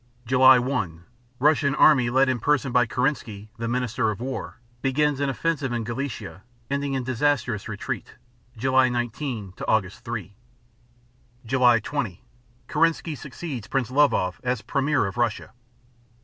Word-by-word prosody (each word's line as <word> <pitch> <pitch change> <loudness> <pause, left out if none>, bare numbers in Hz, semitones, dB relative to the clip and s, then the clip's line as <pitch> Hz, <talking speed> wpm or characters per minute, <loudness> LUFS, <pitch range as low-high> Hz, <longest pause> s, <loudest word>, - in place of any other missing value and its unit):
July 130 +2 +7
1 105 - -2 0.3
Russian 145 0 +3
army 135 -6 +5
led 130 +3 +3
in 130 -2 0
person 140 +1 +1
by 125 -1 +3
Kerensky, 120 -5 -2
the 115 - -2
Minister 125 -1 0
of 105 - -4
War, 130 +2 -5 0.2
begins 145 +1 +1
an 140 -1 0
offensive 145 -1 -1
in 120 -1 -2
Galicia, 115 - -5 0.3
ending 140 -1 -1
in 130 - -1
disastrous 125 -4 0
retreat 105 -2 -5 0.4
(July 130 +2 +3
19 120 -3 -3
Aug. 95 0 0
3). 110 -4 -7 1.1
July 125 -1 +4
20 115 -6 -4 0.4
Kerensky 165 +1 +1
succeeds 135 -2 -7
Prince 125 -3 -1
Lvov 120 -10 +2
as 125 -2 -1
premier 140 -3 +1
of 100 +4 -5
Russia. 120 -3 -1
125 Hz, 135 wpm, -24 LUFS, 110-140 Hz, 1.1 s, July